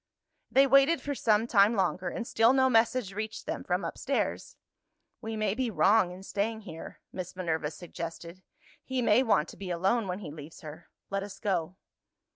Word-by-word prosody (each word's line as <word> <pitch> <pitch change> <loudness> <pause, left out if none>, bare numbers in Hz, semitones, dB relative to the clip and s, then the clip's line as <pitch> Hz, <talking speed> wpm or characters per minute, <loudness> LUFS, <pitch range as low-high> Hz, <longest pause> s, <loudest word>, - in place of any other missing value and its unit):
They 270 +1 +5
waited 275 +4 +5
for 285 +2 -3
some 220 -4 +2
time 215 -1 +4
longer 185 -2 0
and 230 - -5
still 225 +3 +4
no 260 -1 +3
message 225 -2 +2
reached 215 +2 -5
them - - -4
from - - -1
upstairs. - - -2 0.6
"We 225 -1 -4
may 215 -2 0
be 255 +1 -1
wrong 210 -2 +4
in 180 +2 -10
staying 220 +3 -2
here," 165 -6 -10
Miss 185 0 -6
Minerva 160 -4 -1
suggested; 170 +1 -8 0.4
"he 260 -1 -2
may 225 +2 +5
want 205 -11 +2
to - - -12
be 195 -2 -7
alone 190 +6 +1
when 180 0 -3
he 195 -7 -8
leaves 150 +1 -11
her 155 +2 -10 0.2
let 195 0 -1
us 200 0 -8
go." 185 -4 -1
200 Hz, 180 wpm, -29 LUFS, 175-230 Hz, 0.6 s, They